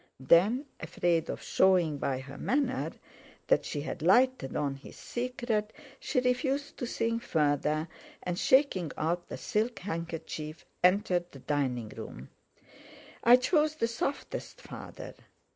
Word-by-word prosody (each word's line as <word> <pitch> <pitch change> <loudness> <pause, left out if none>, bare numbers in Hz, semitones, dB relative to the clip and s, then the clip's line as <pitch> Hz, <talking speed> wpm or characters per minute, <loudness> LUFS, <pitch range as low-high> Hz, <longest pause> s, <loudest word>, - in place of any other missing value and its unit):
Then, 195 - +4
afraid 165 0 0
of - - -4
showing 175 -6 +3
by 130 -1 -1
her 135 +1 -10
manner 260 -1 0 0.5
that - - +3
she 145 - -3
had 160 +2 -5
lighted 240 - +3
on 140 -2 0
his 135 +1 -12
secret, 240 -3 -2 0.3
she - - 0
refused 265 +3 0
to 245 - -3
think 230 0 -1
further, 150 -2 +1 0.4
and, 180 0 -2
shaking 240 - +3
out 175 +3 -1
the - - -6
silk 225 +3 -1
handkerchief, 165 -3 -5 0.2
entered 180 -2 +3
the - - -11
dining 130 -5 -1
room. 65 - -9 0.9
"I 240 +1 +9
chose 300 +4 +2
the 230 - +1
softest, 275 - -4
Father." - - -9
180 Hz, 130 wpm, -30 LUFS, 155-250 Hz, 0.9 s, I